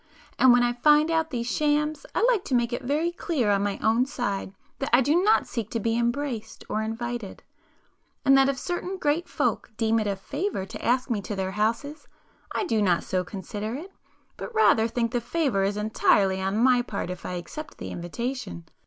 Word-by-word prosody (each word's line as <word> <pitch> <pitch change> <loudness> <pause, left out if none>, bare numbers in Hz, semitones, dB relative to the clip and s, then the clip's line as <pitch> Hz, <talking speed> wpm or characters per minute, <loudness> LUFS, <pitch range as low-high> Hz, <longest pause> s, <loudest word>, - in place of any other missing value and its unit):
And 260 - +7
when 245 0 +5
I 240 0 +2
find 300 +5 +4
out 320 0 +1
these 235 -3 -3
shams, 300 +3 0
I - - +2
like 470 -5 +3
to 260 - 0
make 240 0 +1
it - - -2
very 300 +6 0
clear 290 -11 0
on 200 -1 +2
my 200 -1 -1
own 230 +4 +3
side 200 -8 -3 0.3
that 275 - -2
I 240 - +6
do 295 +7 +3
not 425 +3 +4
seek 225 -3 -4
to 230 - -2
be 225 +1 0
embraced 235 0 -2
or 215 - -1
invited, 225 -1 -5 0.8
and 270 -1 +6
that 270 0 +5
if 275 - -1
certain 360 +4 -3
great 315 +1 0
folks - - -1
deem 225 0 +2
it 215 - -1
a 200 - 0
'favour' 280 - -3
to - - -9
ask 250 +2 +1
me 210 -3 0
to 205 - -5
their 190 -1 -2
houses, 230 +9 -2 0.4
I - - -1
do 225 - +1
not 180 -4 +2
so 185 -1 -1
consider 205 +4 -5
it, 345 +8 -8 0.5
but 475 - -7
rather 230 - +5
think 230 0 -1
the 245 -1 0
'favour' 250 -4 0
is 200 +1 -1
entirely 200 -2 +2
on 195 +2 -1
my 250 +1 +4
part 200 -6 -4
if 180 - -7
I - - -4
accept 240 - -7
the - - -6
invitation. 175 - -5
240 Hz, 205 wpm, -26 LUFS, 210-290 Hz, 0.8 s, And